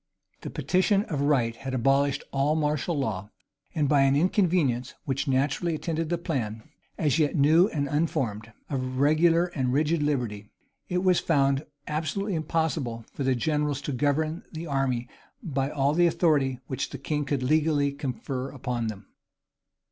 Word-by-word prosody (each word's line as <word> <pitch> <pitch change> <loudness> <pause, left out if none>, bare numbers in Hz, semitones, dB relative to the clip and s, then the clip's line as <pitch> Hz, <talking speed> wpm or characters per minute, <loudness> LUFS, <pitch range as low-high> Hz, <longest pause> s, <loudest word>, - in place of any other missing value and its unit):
[] - - -43
The - - -6
petition 195 +2 +2
of 145 -4 -3
right 130 -6 +2
had 135 -1 -4
abolished 135 +3 +2
all 140 +2 +1
martial 150 +1 0
law; 105 -7 -2 0.5
and 150 -3 +2
by 140 -1 +4
an 135 0 +4
inconvenience 160 - +1
which 135 +2 -2
naturally 140 +5 +1
attended 160 0 -2
the 175 - 0
plan, 115 -10 -3 0.3
as 150 0 +1
yet 150 0 +2
new 160 +5 +5
and 145 -8 -2
unformed, 135 -8 -1 0.2
of 130 -2 -3
regular 165 +4 +4
and 130 -4 0
rigid 155 +4 +1
liberty, 120 -8 -1 0.4
it 180 +1 0
was 185 -2 +4
found 140 -3 +1 0.2
absolutely 160 +7 -2
impossible 155 -7 -1
for 140 - -3
the 130 -1 +2
generals 150 +1 0
to 145 - -4
govern 150 +5 0
the 165 0 -6
army 135 -5 -1 0.4
by 135 -4 -1
all 140 -1 +1
the 175 +2 +4
authority 145 -7 +2
which 130 -2 -3
the - - -6
king 145 +2 -2
could 140 -2 -2
legally 150 0 +2
confer 135 -1 -4
upon 125 -4 -3
them. 105 -3 -6
145 Hz, 160 wpm, -27 LUFS, 130-160 Hz, 0.5 s, new